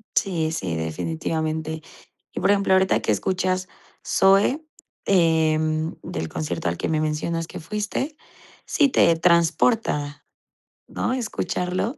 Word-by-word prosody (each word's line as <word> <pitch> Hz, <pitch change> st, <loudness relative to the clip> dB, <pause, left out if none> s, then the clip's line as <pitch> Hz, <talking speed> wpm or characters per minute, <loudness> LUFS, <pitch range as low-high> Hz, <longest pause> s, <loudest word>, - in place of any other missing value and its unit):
Sí, 165 Hz, -5 st, +1 dB
sí, 95 Hz, -, -3 dB
definitivamente. 160 Hz, -, -3 dB, 0.5 s
Y -, -, -4 dB
por -, -, +3 dB
ejemplo, 200 Hz, -1 st, +2 dB
ahorita 190 Hz, -12 st, +3 dB
que 110 Hz, -, +1 dB
escuchas, 185 Hz, -, -1 dB, 0.4 s
Zoe, 200 Hz, +11 st, +3 dB, 0.4 s
em, 160 Hz, -3 st, +2 dB
del 80 Hz, 0 st, -4 dB
concierto 80 Hz, +1 st, -3 dB
al 85 Hz, -, -2 dB
que -, -, -2 dB
me 155 Hz, -1 st, +1 dB
mencionas 155 Hz, +2 st, -1 dB
que -, -, -8 dB
fuiste. 210 Hz, -, -3 dB, 0.5 s
Sí, 290 Hz, -, +3 dB
¿te 170 Hz, -9 st, +4 dB
transporta?, 170 Hz, -2 st, +2 dB, 0.6 s
¿no?, -, -, -2 dB
¿escucharlo? 220 Hz, -, -2 dB
165 Hz, 120 wpm, -23 LUFS, 155-190 Hz, 0.6 s, te